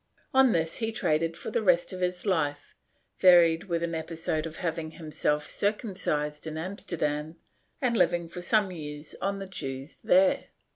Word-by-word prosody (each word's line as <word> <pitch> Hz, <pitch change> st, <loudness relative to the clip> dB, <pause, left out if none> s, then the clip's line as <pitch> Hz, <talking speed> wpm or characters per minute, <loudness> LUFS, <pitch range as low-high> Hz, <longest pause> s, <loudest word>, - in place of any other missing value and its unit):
On 265 Hz, -2 st, +6 dB
this 165 Hz, -2 st, 0 dB
he 225 Hz, -1 st, -1 dB
traded 165 Hz, -5 st, 0 dB
for -, -, -6 dB
the 225 Hz, -, +1 dB
rest 180 Hz, -3 st, +3 dB
of 185 Hz, -, -6 dB
his 180 Hz, +1 st, -1 dB
life, 145 Hz, -7 st, -1 dB, 0.5 s
varied 175 Hz, -2 st, +6 dB
with 170 Hz, -3 st, -1 dB
an 170 Hz, 0 st, -2 dB
episode 160 Hz, -1 st, -2 dB
of 160 Hz, -, -9 dB
having 165 Hz, -2 st, -3 dB
himself 150 Hz, -2 st, -1 dB
circumcised 175 Hz, -8 st, -2 dB
in 155 Hz, 0 st, -4 dB
Amsterdam 160 Hz, -4 st, -3 dB, 0.5 s
and 245 Hz, -2 st, +2 dB
living 175 Hz, -6 st, +2 dB
for 175 Hz, +2 st, -8 dB
some 200 Hz, +1 st, +2 dB
years 150 Hz, -3 st, -7 dB
on 195 Hz, +1 st, -1 dB
the 195 Hz, -, -5 dB
Jews 135 Hz, -6 st, -6 dB
there. 185 Hz, +1 st, +4 dB
170 Hz, 160 wpm, -28 LUFS, 155-185 Hz, 0.5 s, On